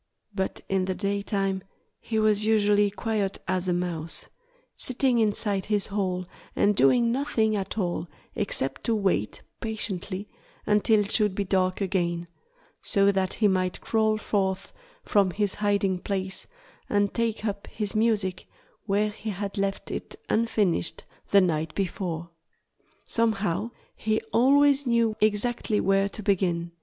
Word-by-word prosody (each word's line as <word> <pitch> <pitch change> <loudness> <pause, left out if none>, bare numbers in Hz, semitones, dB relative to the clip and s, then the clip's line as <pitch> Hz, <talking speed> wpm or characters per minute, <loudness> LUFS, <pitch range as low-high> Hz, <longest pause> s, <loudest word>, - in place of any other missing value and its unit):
But 190 -2 -2
in 190 -1 +1
the 185 0 -2
daytime 200 0 -1 0.4
he 225 - -3
was 215 -1 +3
usually 210 -1 +3
quiet 205 -1 -2
as 185 0 0
a - - +2
mouse, 170 -2 -3 0.5
sitting 255 -1 +1
inside 205 -2 +1
his 205 -2 0
hole 185 -3 -2 0.3
and 205 0 +3
doing 230 - +4
nothing 230 -5 +1
at 195 +1 -3
all 175 -3 -1 0.3
except 200 - -2
to 230 - +2
wait 190 - 0 0.2
patiently 200 -3 -4 0.4
until 210 +1 +4
it 205 - -4
should 210 -4 +4
be 200 - 0
dark 185 0 0
again, 175 -3 -1 0.5
so 200 0 +3
that 190 -1 0
he 215 - +3
might 185 -2 0
crawl 220 -1 +2
forth 195 -3 -1 0.3
from 200 -2 +3
his 200 +2 0
hiding 200 -3 +1
place 190 0 -2 0.4
and 205 -1 +1
take 230 -2 -1
up 200 -1 -3
his 210 -2 -3
music 215 -4 +1 0.4
where 210 +1 +1
he 220 +1 -6
had 200 0 -4
left 195 0 -2
it - - -5 0.2
unfinished 210 - +1 0.3
the 200 - +6
night 160 -3 0
before. 175 -3 -3 0.7
Somehow 215 -3 0 0.3
he 220 0 0
always 280 +2 +5
knew 230 -2 +2
exactly 215 +1 +1
where 195 +1 +2
to 215 - -8
begin. 175 -4 0
200 Hz, 140 wpm, -26 LUFS, 185-215 Hz, 0.7 s, the